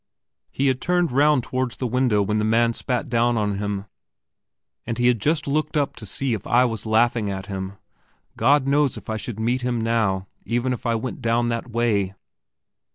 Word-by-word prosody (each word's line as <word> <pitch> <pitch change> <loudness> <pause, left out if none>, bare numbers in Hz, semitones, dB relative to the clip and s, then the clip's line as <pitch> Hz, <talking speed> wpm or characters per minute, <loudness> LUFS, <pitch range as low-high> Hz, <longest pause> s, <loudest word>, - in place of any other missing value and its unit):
He 135 - -1
had 130 -1 +1
turned 175 -3 +1
round 145 0 +3
towards 130 -1 -2
the 130 - -3
window 120 -4 +2
when 105 +2 0
the - - 0
man 115 +2 +3
spat 125 +4 -2
down 120 -1 +2
on 105 -2 -1
him, 100 -1 -3 1.0
and 115 -1 -4
he 120 - +1
had 120 -3 +3
just 150 +2 +1
looked 150 +2 0
up 145 -1 0
to - - -7
see 135 -3 -1
if 105 -3 -4
I 125 +2 +4
was 115 -2 -3
laughing 110 -1 +2
at 95 -1 -4
him. 95 -1 -5 0.6
God 140 -1 +3
knows 140 -1 +2
if - - -7
I 110 - -1
should 110 0 -6
meet 120 +3 0
him 125 -1 -1
now, 110 -4 0 0.2
even 120 +2 0
if 125 - -5
I 115 - +2
went 120 +3 -4
down 120 0 +1
that 115 +1 -3
way. 110 -5 0
120 Hz, 200 wpm, -23 LUFS, 110-130 Hz, 1.0 s, I